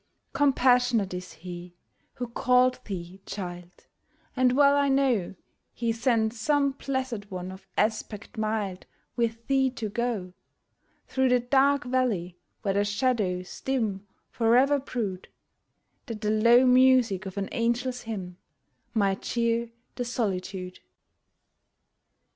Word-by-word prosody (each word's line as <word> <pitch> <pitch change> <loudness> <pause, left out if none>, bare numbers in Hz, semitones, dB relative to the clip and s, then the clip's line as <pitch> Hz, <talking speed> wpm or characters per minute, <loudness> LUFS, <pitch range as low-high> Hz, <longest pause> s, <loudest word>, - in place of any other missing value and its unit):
Compassionate 245 -7 +3
is 180 0 -6
He 175 +1 -9 0.4
who 245 - -4
called 250 +1 +2
thee, 185 -1 -7
child; 180 -2 -7 0.5
And 255 -1 +3
well 280 +1 +5
I 285 -1 +2
know 260 -9 +1 0.4
He 235 -1 0
sent 225 -1 +1
some 280 +4 +1
Blessed 260 -6 -4
One 185 -1 -5
of 190 +1 -12
aspect 215 0 -1
mild 215 -4 -2 0.3
With 230 -1 -1
thee 270 -1 +2
to 235 -4 -5
go 215 -5 -2 0.7
Through 265 -1 +1
the 250 0 +4
dark 275 +3 +3
valley, 225 -9 -1 0.2
where 195 -2 +1
the 200 +1 +2
shadows 205 -4 -1
dim 215 -7 -1 0.2
Forever 250 +5 +3
brood, 215 -9 -4 0.8
That 225 -2 -6
the 210 -1 0
low 235 +4 +5
music 250 -6 +4
of 190 - -8
an 195 -1 -1
angel's 245 +2 -1
hymn 190 -6 -6 0.6
Might 195 -3 +1
cheer 235 0 0 0.2
the 250 - -3
solitude 190 -6 -3
230 Hz, 120 wpm, -27 LUFS, 195-255 Hz, 0.8 s, well